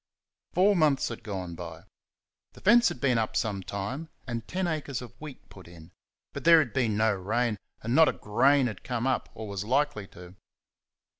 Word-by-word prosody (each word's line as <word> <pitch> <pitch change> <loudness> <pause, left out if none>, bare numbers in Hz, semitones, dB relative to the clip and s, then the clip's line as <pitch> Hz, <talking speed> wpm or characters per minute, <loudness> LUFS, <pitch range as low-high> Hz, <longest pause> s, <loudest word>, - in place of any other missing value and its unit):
Four 195 +3 +4
months 150 -5 +2
had 115 - -7
gone 95 -6 -5
by. 85 -1 -8 0.7
The - - -15
fence 235 +3 +6
had - - -7
been 125 -3 +2
up 110 - -2
some 100 -3 -1
time 100 - -5 0.2
and 115 -3 -5
ten 185 +1 -2
acres 150 -6 -3
of 125 -3 -10
wheat 150 -4 -10
put 95 -3 -14
in; 85 -2 -14 0.4
but - - -6
there 165 0 +8
had 145 -8 +1
been 115 -6 +1
no 110 0 +3
rain, 105 +3 -1 0.2
and 115 +2 -1
not 160 +2 +6
a - - -1
grain 135 +6 +3
had 110 -6 -5
come 125 -2 -2
up, 130 - 0
or 110 -1 -7
was 100 -1 -4
likely 130 -3 0
to. 90 0 -13
115 Hz, 195 wpm, -28 LUFS, 100-145 Hz, 0.7 s, there